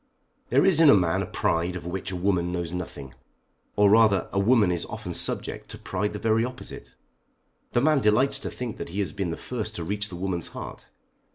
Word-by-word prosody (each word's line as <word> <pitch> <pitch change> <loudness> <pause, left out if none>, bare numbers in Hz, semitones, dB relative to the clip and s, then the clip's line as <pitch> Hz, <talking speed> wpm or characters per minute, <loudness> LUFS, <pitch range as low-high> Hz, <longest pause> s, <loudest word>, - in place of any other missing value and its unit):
There - - +4
is 185 -5 +5
in 160 -3 +7
a - - +8
man 90 -4 +2
a - - -3
pride 85 +2 0
of 90 - -7
which 95 +2 -4
a 95 - -4
woman 90 -1 0
knows 85 -1 -3
nothing. 75 -7 -6 0.6
Or 105 0 +5
rather 110 -3 +4
a 100 - +1
woman 105 -2 +4
is 85 -2 -1
often - - -6
subject - - -2
to - - -8
pride 100 +2 -3
the - - -4
very 110 +1 +2
opposite. 120 - -7 0.8
The 120 - +3
man 155 +1 +4
delights 130 +6 +3
to - - -4
think 125 -3 -6
that - - -6
he 95 +4 -4
has 85 -6 -3
been 95 -3 -2
the 80 - -4
first 110 -3 -5
to 85 - -4
reach 105 +4 -2
the 90 - -8
woman's 90 -2 -3
heart. - - -9
100 Hz, 215 wpm, -26 LUFS, 90-110 Hz, 0.8 s, a